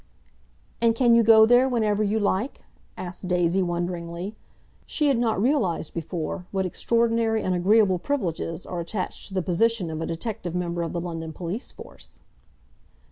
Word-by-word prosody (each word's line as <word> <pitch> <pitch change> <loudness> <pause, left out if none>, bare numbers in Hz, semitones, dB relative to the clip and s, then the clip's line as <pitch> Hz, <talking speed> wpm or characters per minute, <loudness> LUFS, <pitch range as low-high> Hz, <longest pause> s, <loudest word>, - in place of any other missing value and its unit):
"And 230 -1 +3
can 240 -1 +4
you 230 - +6
go 220 -1 +7
there 245 +3 +5
whenever 215 -4 +1
you 210 +1 +1
like?" 205 +5 -1 0.3
asked 180 +1 -6
Daisy 180 +1 +2
wonderingly. 175 +2 -3 0.5
She 300 -2 +1
had 265 -4 +2
not 225 -4 +1
realised 210 - 0
before 175 +2 -4
what 190 -1 -1
extraordinary 230 +3 +1
and 185 - 0
agreeable 190 +1 +3
privileges 175 - -3
are 175 - -5
attached 185 +3 -4
to 195 - -8
the 185 - 0
position 185 0 +1
of 155 0 -4
a - - -2
detective 175 0 -4
member 175 -1 -2
of 165 - -3
the 170 - -2
London 165 -2 -5
Police 180 +9 -5
Force. - - -13
190 Hz, 160 wpm, -25 LUFS, 175-225 Hz, 0.5 s, go